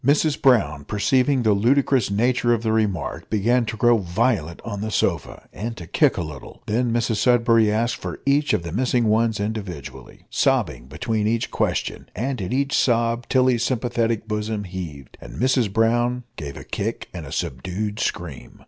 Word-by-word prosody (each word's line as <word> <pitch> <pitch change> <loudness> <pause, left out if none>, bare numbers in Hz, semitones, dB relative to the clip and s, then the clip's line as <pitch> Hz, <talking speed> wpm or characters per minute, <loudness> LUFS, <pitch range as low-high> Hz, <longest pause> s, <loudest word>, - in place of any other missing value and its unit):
Mrs 145 +3 +2
Brown, 85 - +3
perceiving 130 - +1
the 110 -2 +4
ludicrous 130 +2 +2
nature 120 +4 +2
of 115 - -5
the 110 - +1
remark, 105 -7 -1
began 115 +3 +2
to 110 - -4
grow 120 0 +4
violent 95 -2 0
on 100 -4 -4
the 110 - -2
sofa, - - -1
and 115 +3 -5
to 85 - -8
kick - - +2
a - - -1
little. 75 -4 -10
Then 120 +3 0
Mrs 115 -1 0
Sudberry 115 -1 +4
asked 115 +3 0
for - - -6
each 145 +2 +2
of 85 - +1
the 85 - -6
missing 125 +3 +1
ones 110 0 +2
individually 100 - -6
sobbing 65 - +1
between 105 - -1
each 115 +1 -1
question - - -2
and 125 +2 -2
at 90 - -4
each 140 +2 0
sob 115 -1 +1
Tilly's 130 -3 +3
sympathetic 115 -3 -1
bosom 105 -1 -2
heaved, 85 -8 -8
and - - -10
Mrs 125 -4 +1
Brown 120 +3 +1
gave 70 -3 -7
a - - -8
kick - - -4
and - - -7
a - - -9
subdued 95 - -3
scream. 85 -10 -4
115 Hz, 175 wpm, -23 LUFS, 100-120 Hz, -, the